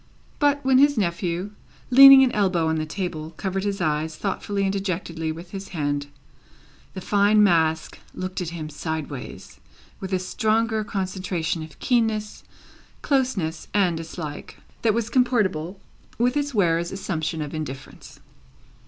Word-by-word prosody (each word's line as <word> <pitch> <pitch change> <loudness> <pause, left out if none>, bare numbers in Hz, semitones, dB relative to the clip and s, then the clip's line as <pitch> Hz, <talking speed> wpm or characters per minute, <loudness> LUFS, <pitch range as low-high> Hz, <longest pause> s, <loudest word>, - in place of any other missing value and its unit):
But, 285 -1 +2
when 260 -1 +5
his 285 -1 +4
nephew, 175 0 -1 0.4
leaning 275 +1 +10
an 255 - +2
elbow 185 -7 +1
on 160 0 0
the 155 0 -2
table, 165 -3 -5
covered 195 -1 -2
his 200 -1 -2
eyes 155 +1 -1
thoughtfully 200 +2 -2
and 195 0 0
dejectedly 170 -4 -3
with 170 +2 -9
his 195 0 -7
hand, 145 -1 -1 0.9
the 190 - -5
fine 205 +2 +4
mask 160 -4 +1 0.2
looked 185 0 -4
at 175 - -3
him 165 -2 -6
sideways 155 -3 -6 0.4
with 190 0 -6
a 190 - +2
stronger 220 +3 0
concentration 185 -4 -3
of 155 0 -10
keenness, 225 -4 0 0.6
closeness, 215 - -1
and 185 -5 +3
dislike, 160 -2 -7 0.2
than 220 -2 +2
was 230 -1 -2
comportable 200 -9 +1 0.4
with 245 +3 +1
its 290 -1 -1
wearer's 170 -6 +1
assumption 165 -4 -3
of 150 -2 -5
indifference. 150 -4 -8
185 Hz, 140 wpm, -24 LUFS, 160-215 Hz, 0.9 s, leaning